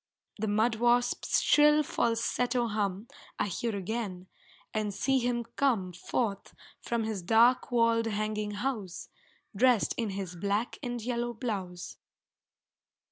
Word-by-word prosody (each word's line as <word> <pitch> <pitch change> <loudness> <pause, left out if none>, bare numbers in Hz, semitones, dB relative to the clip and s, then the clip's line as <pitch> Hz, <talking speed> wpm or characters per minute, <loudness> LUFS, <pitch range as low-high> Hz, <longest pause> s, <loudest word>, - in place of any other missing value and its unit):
The 220 - -1
mud 220 +2 +2
wasp's 240 +1 +2
shrill 300 0 +5
falsetto 240 0 0
hum 205 0 -2 0.3
I - - +1
hear 215 +3 -2
again, 195 -2 -4 0.5
and 215 -1 -1
see 265 +7 +1
him 240 -1 0
come 220 -10 +1
Forth 200 +3 -3 0.2
from 235 -1 -2
his 220 -3 -3
dark 230 +9 +4
walled 230 -1 +3
hanging 215 0 -2 0.2
house, 210 -10 -4 0.5
Dressed 240 0 +3
in 230 -3 -1
his 185 -2 -5
black 205 +6 -1
and 245 -3 -3
yellow 240 +1 -2
blouse. 190 -7 -5
225 Hz, 125 wpm, -30 LUFS, 205-240 Hz, 0.5 s, shrill